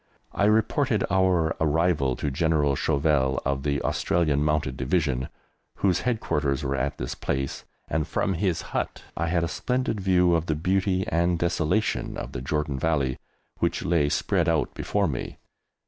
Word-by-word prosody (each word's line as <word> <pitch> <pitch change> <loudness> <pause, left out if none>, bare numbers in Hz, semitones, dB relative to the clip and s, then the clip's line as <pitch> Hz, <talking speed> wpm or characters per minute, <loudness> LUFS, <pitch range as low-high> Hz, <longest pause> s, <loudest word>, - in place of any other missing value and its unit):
I 100 - +1
reported 110 +2 +2
our 90 -4 +2
arrival 80 -4 +2
to 75 - -2
General 75 -1 +2
Chauvel, 70 -3 +1
of 70 -1 0
the 70 0 0
Australian 75 -4 +1
Mounted 75 -4 0
Division, 65 -2 0 0.5
whose 90 -3 +1
headquarters 75 - -1
were 70 0 -1
at 70 +2 -2
this - - -4
place, 70 0 -3 0.2
and 80 0 -1
from 95 - 0
his 90 -1 -1
hut - - -2
I 85 - -1
had 85 0 +1
a - - 0
splendid 110 +3 -1
view 90 -2 +3
of 85 0 +1
the 75 - +1
beauty 95 +3 +1
and 85 +1 +1
desolation 85 +4 0
of - - -6
the - - -5
Jordan 75 0 -2
Valley 70 -4 0 0.4
which - - 0
lay 80 -4 +2
spread 85 +2 +1
out 80 -6 0
before 100 -2 0
me. 65 -6 -4
80 Hz, 160 wpm, -26 LUFS, 70-90 Hz, 0.5 s, view